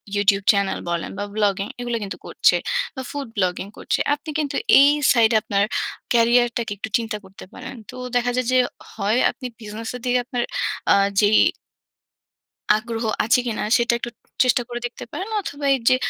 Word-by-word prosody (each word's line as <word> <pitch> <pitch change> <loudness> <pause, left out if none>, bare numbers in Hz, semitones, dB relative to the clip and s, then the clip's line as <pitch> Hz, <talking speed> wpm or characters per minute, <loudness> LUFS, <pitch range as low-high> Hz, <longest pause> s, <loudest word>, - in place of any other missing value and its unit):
YouTube 200 -1 +2
channel 200 -2 0
বলেন 170 -1 -2
বা, 205 - -2
vlogging 200 -2 +1
এগুলো 240 -1 -2
কিন্তু 195 - -6
করছে। - - +3 0.4
বা, 260 - -4
ফুড 285 -2 -5
ব্লগিং 185 0 0
করছে। - - -1
আপনি 295 +2 -6
কিন্তু 290 -2 -2 0.2
এই 280 +1 +7 0.2
সাইডে 230 -2 +4
আপনার 200 0 +1 0.5
ক্যারিয়ারটাকে 235 -1 +3
একটু 220 - -5
চিন্তা 225 -2 -4
করতে 190 +1 -12
পারেন। 260 +1 -8 0.2
তো 255 - -9 0.2
দেখা 245 0 +2
যায় 255 -2 0
যে, 255 - +4 0.4
হয় 215 +2 0
আপনি 255 - -11 0.2
বিজনেসের 225 +3 -6
দিকে 250 0 +2
আপনার 245 -2 -2 0.5
আ - - +6 0.3
যেই 210 +1 +5 1.4
আগ্রহ 225 +1 -3 0.2
আছে 235 +3 +3
কিনা? 225 - -2
সেটা 235 -1 +2
একটু 240 - -4 0.3
চেষ্টা 250 -1 +3
করে 240 0 -4
দেখতে 240 - -6
পারেন। 380 +4 -4
অথবা 285 -6 -6
এইযে 255 0 +3
235 Hz, 165 wpm, -22 LUFS, 205-250 Hz, 1.4 s, এই